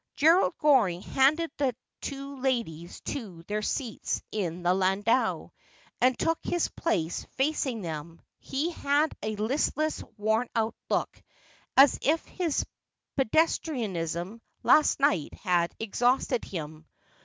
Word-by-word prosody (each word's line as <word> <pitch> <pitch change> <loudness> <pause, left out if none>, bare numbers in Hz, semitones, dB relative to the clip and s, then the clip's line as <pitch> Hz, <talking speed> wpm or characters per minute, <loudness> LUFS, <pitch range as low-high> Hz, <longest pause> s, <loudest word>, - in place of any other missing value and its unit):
Gerald 335 +4 +4
Goring 230 - +3
handed 300 +5 +2
the 265 -4 0 0.3
two 275 0 -6
ladies 230 -11 -2
to 195 -12 -6
their 210 +4 -2
seats 235 +1 -2
in 180 -4 -3
the 180 +1 +4
landau, 195 +6 +1 0.5
and 255 0 +4
took 330 0 +1
his 350 -1 0
place 170 - -2
facing 265 -4 0
them. 165 0 -6 0.2
He 290 +6 -2
had 295 -1 +1
a 215 +1 -2
listless 285 +8 0
worn 220 +3 +1
out 225 0 +1 0.2
look, - - -1 0.6
as 275 +1 +7
if 315 +3 +1
his 340 -5 -1 0.5
pedestrianism 225 - 0 0.2
last 305 -1 +5
night 275 - +1
had 175 -3 0
exhausted 245 +3 +1
him. 155 -3 -7
235 Hz, 120 wpm, -28 LUFS, 185-285 Hz, 0.6 s, as